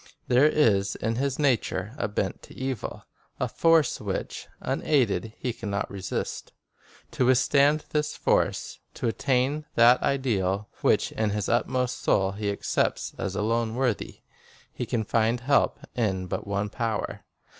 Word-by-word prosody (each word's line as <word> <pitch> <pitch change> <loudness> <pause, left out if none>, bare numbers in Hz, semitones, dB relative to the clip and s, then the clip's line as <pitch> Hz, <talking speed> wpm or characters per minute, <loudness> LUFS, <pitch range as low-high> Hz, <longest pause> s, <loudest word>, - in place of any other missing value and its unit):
There 125 +4 +5
is 100 -11 +2
in 115 +1 -2
his 135 0 -1
nature 140 -6 0
a - - -1
bent - - -2
to - - -14
evil, 130 -4 -4 0.3
a - - 0
force 165 -2 +3
which, - - -4
unaided, 120 - 0
he 125 - -2
can 110 -2 -6
not 100 0 -2
resist. 95 -2 -4 0.6
To 125 - +1
withstand 140 +4 +4
this 150 0 0
force, - - 0 0.2
to - - -2
attain 135 +5 0
that 120 +2 +6
ideal 105 -7 0
which - - +2
in 110 -1 0
his 105 -1 -2
inmost 125 +1 0
soul 95 -1 +2
he 100 +1 -3
accepts 100 - -1
as 95 -1 -3
alone 115 +2 0
worthy, 125 -4 -1 0.5
he - - -4
can 115 -2 0
find 115 +3 +1
help 140 +2 +2 0.2
in 95 -7 0
but 90 - -4
one 100 +1 -1
power. 115 -3 -3
115 Hz, 145 wpm, -26 LUFS, 105-135 Hz, 0.6 s, that